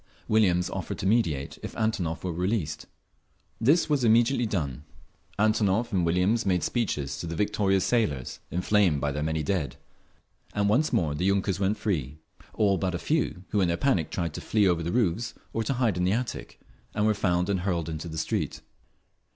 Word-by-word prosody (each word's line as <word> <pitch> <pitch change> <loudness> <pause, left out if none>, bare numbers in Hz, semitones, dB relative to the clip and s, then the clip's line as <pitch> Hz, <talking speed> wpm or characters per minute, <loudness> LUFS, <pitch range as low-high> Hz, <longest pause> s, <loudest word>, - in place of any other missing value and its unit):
Williams 95 -5 +3
offered - - -4
to - - -4
mediate 95 - +1
if - - -7
Antonov 95 -8 -1
were 90 -2 -2
released. 90 -2 -2 0.7
This 145 +9 +4
was 145 -4 +1
immediately 120 +2 +4
done; 75 - -3 0.5
Antonov 110 +1 +2
and 90 -2 +2
Williams 90 +7 +2
made 90 -5 +1
speeches 75 - -1
to 85 - -4
the 85 - -4
victorious 100 -1 +1
sailors, 80 - 0
inflamed 90 -3 +2
by 70 0 -1
their 75 +2 -3
many 80 0 -1
dead—and 95 +4 -5
once 130 +10 +2
more 85 -11 +1
the 85 +5 -2
yunkers 100 -1 +1
went 100 +2 +1
free…. 75 - -2 0.4
All 100 -3 +2
but 95 -2 -1
a - - 0
few, 125 - -1
who 105 - +1
in 90 - +3
their 85 0 0
panic 95 - +1
tried 85 -4 -3
to - - -6
flee 105 -3 +2
over 85 -2 +2
the 85 +1 -2
roofs, 115 0 0 0.2
or 115 - 0
to 135 - 0
hide 120 -7 +1
in 90 - 0
the 95 +2 +2
attic, 110 - -4 0.4
and 105 0 +1
were 110 - +4
found 90 -3 +1
and 100 -2 0
hurled 90 -3 -1
into 80 +1 -5
the 80 -1 -6
street. 80 - -2
95 Hz, 185 wpm, -27 LUFS, 85-110 Hz, 0.7 s, This